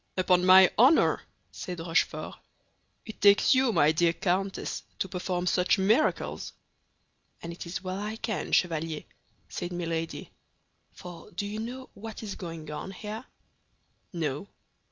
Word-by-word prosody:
"Upon 180 -1 +3
my 185 0 +8
honor," 265 +7 +5 0.3
said 180 -1 -6
Rochefort, 165 +2 -1 0.7
"it 220 - -10
takes 205 +5 +6
you, 260 -2 +3
my 150 -7 +4
dear 165 +1 +2
countess, 190 +2 -2 0.2
to - - -1
perform 180 -1 -3
such 180 +2 +2
miracles!" 215 +10 +1 0.9
"And 170 0 -5
it 170 - -8
is 175 +2 -5
well 185 +1 -4
I 210 +2 -4
can, 225 -2 -3
Chevalier," 160 -3 0 0.4
said 175 - -5
Milady, 165 -2 -4 0.6
"for 175 0 -11
do 205 +1 -4
you 210 +1 -4
know 250 +4 -6
what 225 +2 -8
is 205 -2 -4
going 165 -4 -7
on 150 - -5
here?" 210 +5 -7 0.9
"No." 155 0 -3
185 Hz, 135 wpm, -28 LUFS, 170-210 Hz, 0.9 s, my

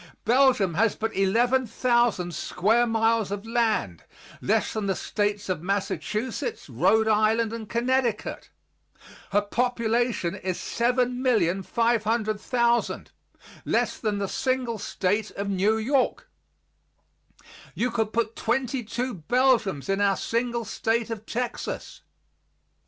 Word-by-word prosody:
Belgium 245 -6 +4
has 215 +5 +2
but 225 +1 -3
11,000 235 -2 +2
square 225 +9 +1
miles 225 -2 +1
of 205 +1 -4
land, 225 - 0 0.4
less 220 +1 +1
than 215 -2 -2
the 190 - +1
States 205 +1 -2
of 180 -4 -2
Massachusetts, 210 - -3
Rhode 220 0 +2
Island 220 +1 +2
and 225 -2 -6
Connecticut. 240 -1 -1 0.8
Her 205 +1 +2
population 235 -3 0
is 190 -2 -3
7,500,000, 235 -1 +1 0.5
less - - 0
than 215 -3 -1
the 200 -1 -2
single 255 -1 -1
State 205 +3 -1
of 200 0 -2
New 200 +3 +2
York. 265 - 0 1.5
You 250 +1 0
could 220 -2 -1
put 230 0 -1
twenty 250 +2 -1
two 245 +4 -3
Belgiums 205 - +1
in 195 +1 0
our 200 -1 +3
single 235 0 -1
State 230 +1 -1
of 220 -1 -6
Texas. 245 +1 -4
225 Hz, 110 wpm, -26 LUFS, 205-240 Hz, 1.5 s, Belgium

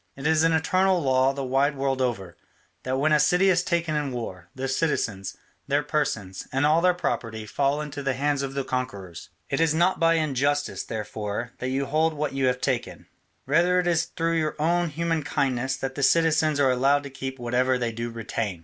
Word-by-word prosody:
It 135 - -9
is 160 0 +3
an 165 - +4
eternal 185 +3 +2
law 130 -3 +3
the 135 0 -5
wide 135 +3 +1
world 135 -1 0
over, 100 -9 -2 0.5
that 130 +1 -2
when 155 +3 +2
a 150 - +5
city 180 +5 +4
is 180 0 +2
taken 170 -3 -1
in 145 -2 -1
war, 95 -8 -6
the 130 +1 -3
citizens, 115 - -1 0.3
their 145 +1 +1
persons, 110 -11 -2
and 135 +2 +1
all 155 +3 +4
their 180 0 +3
property 110 -10 -3
fall 140 +6 0
into 145 -1 -6
the 135 -2 -1
hands 145 +1 0
of 135 0 -4
the 140 - -1
conquerors. 100 -10 -5 0.2
It 140 - 0
is 160 -1 +2
not 175 +3 +2
by 165 0 +4
injustice, 145 -2 0
therefore, 110 +2 -4
that 125 - -2
you 135 +1 -1
hold 155 +3 +1
what 150 -1 -2
you 135 -1 +1
have 125 0 0
taken, 130 -4 -2 0.4
rather 175 +6 +3
it 180 - 0
is 170 -1 +2
through 165 0 -1
your 155 -1 -1
own 170 +3 +1
human 165 +1 -1
kindness 135 -3 -1
that 135 0 -4
the 140 - -5
citizens 155 0 +3
are 135 -2 +4
allowed 135 +3 +2
to 140 - -8
keep 130 0 -6
whatever 125 +1 +1
they 120 -2 -2
do 115 +1 -4
retain. 115 -4 -4
140 Hz, 205 wpm, -25 LUFS, 125-160 Hz, 0.5 s, a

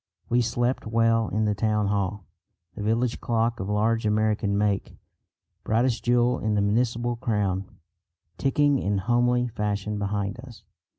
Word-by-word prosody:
We 120 +1 +3
slept 120 +1 -1
well 115 0 +2
in 110 +1 0
the 105 - +1
town 105 +1 0
hall, 100 -1 -2 0.5
the - - -8
village 115 +3 0
clock 115 0 0
of 95 - -4
large 110 +2 +1
American 105 -1 +1
make, 100 -2 -1 0.7
brightest 115 +1 +1
jewel 120 +1 +2
in 105 -1 0
the 105 - +2
municipal 120 +3 0
crown, 100 -6 -1 0.7
ticking 145 0 +2
in 100 -2 0
homely 120 +4 +2
fashion 105 -1 -2
behind 100 +2 -2
us. 120 -5 -12
110 Hz, 140 wpm, -25 LUFS, 105-120 Hz, 0.7 s, We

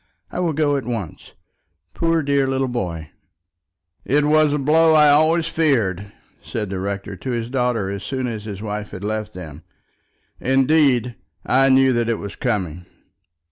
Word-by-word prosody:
I - - -4
will 170 -3 0
go 145 -1 +1
at 135 - -4
once. 115 -9 -6 0.6
Poor 165 -1 +1
dear 140 -1 +1
little 135 0 0
boy." 90 -11 -4 0.9
"It 145 +2 +2
was 155 0 +4
a 150 - +1
blow 160 +3 +4
I 150 -1 +6
always 155 +3 +3
feared," 105 - 0 0.3
said 105 -4 -5
the 95 - -3
rector 100 +1 -4
to 130 - -7
his 120 -1 -3
daughter 125 -6 0
as 100 -1 -5
soon 130 +5 -3
as 110 -3 -5
his 105 -1 -7
wife 105 -1 -4
had 95 - -9
left 110 0 -3
them. 80 -4 -9 0.8
"Indeed, 130 -2 +2 0.3
I 135 +2 +3
knew 130 0 +4
that 120 -1 0
it 115 - 0
was 100 0 -7
coming." 90 - -3
125 Hz, 165 wpm, -21 LUFS, 105-145 Hz, 0.9 s, I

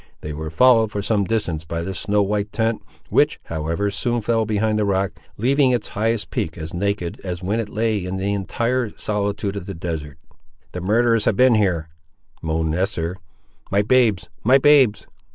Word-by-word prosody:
They 75 - -5
were 80 +1 -5
followed 115 +4 +4
for 100 -1 -3
some 105 -1 +1
distance 95 -8 -2
by 85 +1 -4
the 95 +2 -4
snow 105 +2 +1
white 105 +1 -1
tent, 115 0 0 0.3
which, - - +2
however, 85 +5 -2
soon 120 +3 -1
fell 115 0 +1
behind 110 0 +1
the - - +2
rock, 100 -1 +1 0.3
leaving 135 +4 +3
its 125 -2 0
highest 110 +1 -1
peak 80 +1 -2
as 80 0 -6
naked 95 -1 -2
as 90 -1 -5
when 105 +5 0
it 110 -2 -3
lay 110 -3 0
in 90 +1 -4
the 100 +1 -1
entire 115 +5 -1
solitude 100 -1 -2
of 100 -1 -6
the 95 - -5
desert. 80 -5 -5 0.5
"The 90 - -5
murderers 115 +3 +2
have - - +2
been 130 +3 +5
here!" 90 -7 +1 0.5
moaned 80 0 -1
Esther. 90 -1 -1 0.5
"My 100 +1 +2
babes! 110 -7 +3 0.2
my 130 +4 +6
babes!" 135 -6 +4
100 Hz, 180 wpm, -21 LUFS, 90-115 Hz, 0.5 s, my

